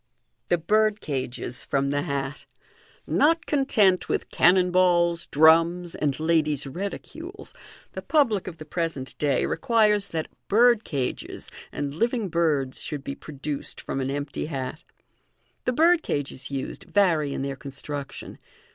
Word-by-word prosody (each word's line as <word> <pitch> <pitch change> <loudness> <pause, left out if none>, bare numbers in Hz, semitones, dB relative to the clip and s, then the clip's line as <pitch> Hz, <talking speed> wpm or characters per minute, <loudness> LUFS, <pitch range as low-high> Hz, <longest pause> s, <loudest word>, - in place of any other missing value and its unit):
The 175 - +4
Birdcages 165 - 0
prom 140 0 +1
the 145 0 0
Hat. 140 0 -4 0.3
— - - -29 0.2
Not 330 +2 +3
content 215 -10 +2
with - - -2
cannon 180 +1 +4
balls, 175 -2 +3
drums, 165 +4 +4
and 140 -2 -1
ladies' 155 -3 +1
reticules, 200 - -7 0.4
the - - -6
public 235 - +2
of 170 -3 -6
the 155 - -9
present 160 -5 -3
day 140 -3 +2
requires 215 -5 +2
that 160 -3 -3 0.2
birdcages 215 - +1 0.2
and 140 -1 -3
living 230 - 0
birds 155 -6 0
should 145 -2 -5
be 140 - -4
produced 145 0 -6
from 135 - -3
an 130 - -2
empty 145 +1 -3
hat. 140 +1 -5 0.8
The 250 - +1
birdcages 245 - +1
used 135 -1 -5
vary 165 -8 +2
in 135 - -3
their 140 0 -3
construction. 140 +1 -7
160 Hz, 130 wpm, -25 LUFS, 140-200 Hz, 0.8 s, The